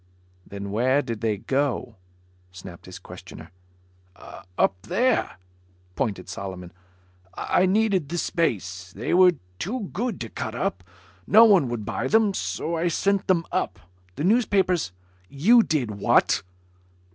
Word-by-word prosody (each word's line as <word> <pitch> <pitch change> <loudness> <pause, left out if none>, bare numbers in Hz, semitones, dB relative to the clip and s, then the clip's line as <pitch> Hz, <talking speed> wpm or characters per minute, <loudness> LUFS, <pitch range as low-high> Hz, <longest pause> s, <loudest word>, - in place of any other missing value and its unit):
"Then 100 0 -7
where 130 +7 +2
did 115 -4 -5
they 110 -3 0
go?" 135 +4 -1 0.6
snapped 90 -1 -11
his - - -9
questioner. - - -12 1.1
"Up - - +3
there," 235 - 0 0.6
pointed 100 -8 -2
Solomon. 90 -2 -7 0.6
"I 185 - +1
needed 195 -6 +1
the 175 - -3
space. 95 - -2
They 105 - -3
were 180 0 +6 0.3
too 210 +1 -4
good 225 0 -2
to 115 - -5
cut - - -5
up. 90 +1 -2 0.4
No 225 +2 +8
one 190 - +4
would 115 -3 -4
buy 115 +3 -2
them. 220 +3 +3
So 170 -2 -3
I 165 +1 0
sent 195 +4 0
them 170 -3 +2
up. 185 - -1 0.4
The - - -4
newspapers 190 - +2 0.3
" 90 0 -34 0.2
"You 235 +2 +8
did 145 - -1
what?" 100 -1 +2
150 Hz, 135 wpm, -24 LUFS, -, 1.1 s, No